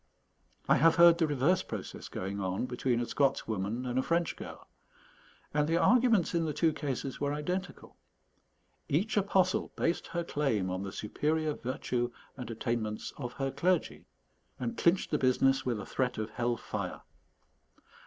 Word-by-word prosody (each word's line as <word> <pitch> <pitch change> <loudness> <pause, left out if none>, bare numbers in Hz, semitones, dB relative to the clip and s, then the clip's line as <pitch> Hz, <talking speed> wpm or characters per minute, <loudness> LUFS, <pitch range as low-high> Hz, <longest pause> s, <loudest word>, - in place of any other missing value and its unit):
I - - +5
have 165 +1 +5
heard 170 -1 +7
the 165 - +3
reverse 150 +6 +2
process - - -7
going 100 +2 -4
on 95 +4 -1
between 125 -1 0
a - - -1
Scots 140 +2 +1
woman 110 +3 -2
and 125 +1 0
a - - +3
French 170 +3 0
girl; - - -9 0.9
and 150 0 +2
the 165 - +3
arguments 230 -3 +4
in 165 -1 +1
the 155 - -2
two 160 +1 +2
cases 135 -2 -4
were 145 0 +1
identical. 180 +5 -4 0.9
Each 195 +10 +1
apostle 190 -2 +2
based 170 - 0
her 170 0 -2
claim 115 - 0
on 95 +1 -2
the 100 0 -5
superior 155 +9 -1
virtue 125 -2 -2 0.3
and 125 -4 -7
attainments 115 -2 -3
of 125 -3 -5
her 135 +1 -2
clergy, 180 +7 0 0.5
and 235 - -3
clinched 175 -1 +2
the 150 - +1
business 135 +1 +3
with 120 -4 0
a 100 - -6
threat 125 -2 -1
of 110 0 -3
hell 120 0 -1
fire. - - -5
140 Hz, 165 wpm, -31 LUFS, 120-170 Hz, 0.9 s, heard